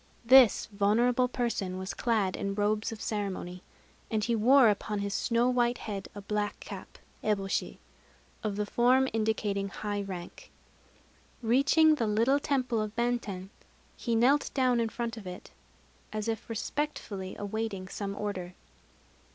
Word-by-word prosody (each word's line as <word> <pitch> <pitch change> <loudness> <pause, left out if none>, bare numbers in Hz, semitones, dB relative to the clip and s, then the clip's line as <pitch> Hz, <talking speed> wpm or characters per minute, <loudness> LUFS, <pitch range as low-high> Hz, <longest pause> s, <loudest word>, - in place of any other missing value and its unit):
This 255 -2 +7
venerable 235 +5 +3
person 230 -7 -2
was 190 +1 -4
clad 215 -6 0
in 200 0 -3
robes 210 +1 0
of 225 - -7
ceremony; 190 -4 -3 0.5
and 215 -1 0
he 235 0 +1
wore 250 +3 +6
upon 210 0 -1
his 200 0 -2
snow 235 +2 +1
white 245 -1 +2
head 200 -3 -5
a 205 - -6
black 205 +1 -2
cap - - -9 0.3
(eboshi) 195 -2 -1 0.7
of 210 -2 -1
the 210 0 -1
form 250 +5 +3
indicating 215 -3 0
high 205 0 -3
rank. 185 -3 -8 0.9
Reaching 285 +7 +5
the 235 -7 0
little 230 +7 +3
temple 255 -6 0
of 215 0 -4
Benten, 225 -6 -2 0.4
he 235 -2 -1
knelt 265 +6 +3
down 255 -3 +3
in 230 -1 0
front 235 0 -4
of 205 -4 -8
it, 180 0 -9 0.6
as 215 0 -3
if 225 0 -3
respectfully 225 -5 -3
awaiting 205 -2 -3
some 200 0 -5
order. 190 -4 -4
215 Hz, 145 wpm, -29 LUFS, 200-240 Hz, 0.9 s, This